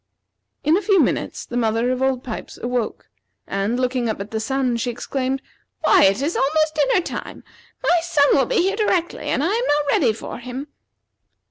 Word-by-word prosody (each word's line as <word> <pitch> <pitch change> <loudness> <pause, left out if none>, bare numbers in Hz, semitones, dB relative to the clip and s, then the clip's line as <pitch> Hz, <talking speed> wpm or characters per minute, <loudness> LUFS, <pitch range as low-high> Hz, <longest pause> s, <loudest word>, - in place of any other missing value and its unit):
In 305 +3 +4
a 390 - +1
few 400 -3 +3
minutes - - 0
the 245 - -7
mother 230 +1 +1
of 255 0 -2
old 265 -1 +1
Pipes 225 - -7
awoke, 240 -2 -2 0.4
and 200 +5 -1
looking 250 -2 0
up 215 - -3
at 200 +1 -6
the 220 - -2
sun, 255 +1 0
she 235 +2 -2
exclaimed: 260 +2 -3 0.4
"Why, - - +6
it 195 +7 +2
is 320 +4 -1
almost 310 +3 +2
dinner 300 +4 +2
time! - - -7 0.4
My 350 -8 +4
son 305 -4 +3
will 275 - +3
be 485 -8 +2
here 390 +2 +1
directly, 375 -5 0
and 275 - 0
I 355 +6 +1
am 475 +3 0
not 295 0 +2
ready 245 -7 +3
for 220 - -7
him." 255 +4 -7
265 Hz, 195 wpm, -21 LUFS, 240-315 Hz, 0.4 s, Why